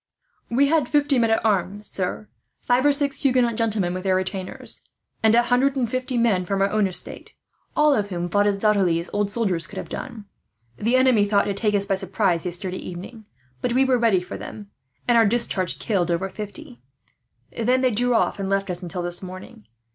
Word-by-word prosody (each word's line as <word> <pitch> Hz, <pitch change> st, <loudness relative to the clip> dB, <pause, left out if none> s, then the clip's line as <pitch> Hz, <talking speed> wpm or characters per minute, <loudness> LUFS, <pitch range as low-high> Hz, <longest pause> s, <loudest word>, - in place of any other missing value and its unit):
"We 260 Hz, +4 st, +3 dB
had 310 Hz, -5 st, +2 dB
fifty 290 Hz, -3 st, +2 dB
men 230 Hz, -1 st, +2 dB
at 225 Hz, 0 st, +1 dB
arms, 205 Hz, 0 st, 0 dB
sir, 190 Hz, +3 st, -3 dB, 0.3 s
five 245 Hz, +1 st, +1 dB
or -, -, +6 dB
six 285 Hz, 0 st, 0 dB
Huguenot 250 Hz, -4 st, +2 dB
gentlemen 215 Hz, -6 st, 0 dB
with 185 Hz, -, -4 dB
their 190 Hz, -1 st, +2 dB
retainers, 185 Hz, 0 st, -3 dB, 0.4 s
and 220 Hz, 0 st, +4 dB
a 240 Hz, -, +5 dB
hundred 250 Hz, +3 st, +2 dB
and 255 Hz, -3 st, 0 dB
fifty 255 Hz, +1 st, -2 dB
men 220 Hz, -6 st, +2 dB
from 195 Hz, +2 st, -2 dB
our 195 Hz, -, +1 dB
own 215 Hz, -2 st, +2 dB
estate; 185 Hz, -, -4 dB, 0.4 s
all 300 Hz, -1 st, +4 dB
of 205 Hz, -5 st, 0 dB
whom 175 Hz, -2 st, -3 dB
fought 205 Hz, +4 st, +2 dB
as 200 Hz, -1 st, +1 dB
doughtily 195 Hz, -5 st, +2 dB
as 170 Hz, -, -7 dB
old 205 Hz, -1 st, 0 dB
soldiers 200 Hz, -6 st, -1 dB
could -, -, -8 dB
have -, -, -6 dB
done. 235 Hz, -5 st, -7 dB, 0.5 s
"The 230 Hz, -, +1 dB
enemy 255 Hz, -5 st, +4 dB
thought 200 Hz, -1 st, +2 dB
to 200 Hz, -, -1 dB
take 210 Hz, +1 st, 0 dB
us 200 Hz, 0 st, +1 dB
by 200 Hz, -, 0 dB
surprise, 190 Hz, -2 st, 0 dB
yesterday 180 Hz, +1 st, -2 dB
evening; 195 Hz, +5 st, -9 dB, 0.4 s
but 240 Hz, -, -1 dB
we 265 Hz, +2 st, +3 dB
were 255 Hz, -2 st, +2 dB
ready 220 Hz, -6 st, +3 dB
for 180 Hz, -, -7 dB
them, 205 Hz, -1 st, -9 dB, 0.4 s
and 240 Hz, -1 st, +5 dB
our 225 Hz, -, +5 dB
discharge 200 Hz, -5 st, +1 dB
killed 190 Hz, -6 st, -1 dB
over 175 Hz, +3 st, -1 dB
fifty. 235 Hz, +7 st, -9 dB, 0.7 s
Then 250 Hz, +3 st, +1 dB
they 255 Hz, -1 st, +2 dB
drew 245 Hz, +2 st, +1 dB
off, 225 Hz, -, +1 dB
and 195 Hz, -1 st, -3 dB
left 195 Hz, -1 st, 0 dB
us 175 Hz, +1 st, -4 dB
until 180 Hz, 0 st, -4 dB
this 175 Hz, 0 st, -3 dB
morning. 185 Hz, -, -10 dB
210 Hz, 210 wpm, -23 LUFS, 190-245 Hz, 0.7 s, or